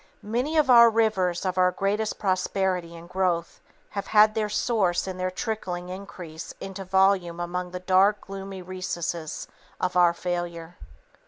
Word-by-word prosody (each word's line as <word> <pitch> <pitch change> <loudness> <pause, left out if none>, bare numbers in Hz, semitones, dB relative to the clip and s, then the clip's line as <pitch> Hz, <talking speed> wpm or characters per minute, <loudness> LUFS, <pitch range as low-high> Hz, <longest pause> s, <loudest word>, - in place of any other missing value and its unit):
Many 250 +9 -1
of 305 - +5
the 235 -3 +8
rivers 205 -6 +1
of 185 0 -1
our 180 0 +5
greatest 205 +4 -1
prosperity 185 -2 -1
and 170 +1 -11
growth 180 -2 -1 0.3
have 200 - -5
had 215 0 +6
their 215 -1 -1
source 210 -4 +1
and 185 -1 -6
their 185 0 0
trickling 185 -3 -4
increase 180 -4 -8
into 195 0 -6
volume 190 -2 +2
among 180 +1 -3
the 180 0 -6
dark, 190 +3 +3
gloomy 195 -1 -8
recesses 175 -3 -4 0.3
of 180 0 -1
our 175 -1 +5
failure. 175 -1 -4
185 Hz, 150 wpm, -26 LUFS, 175-200 Hz, 0.3 s, the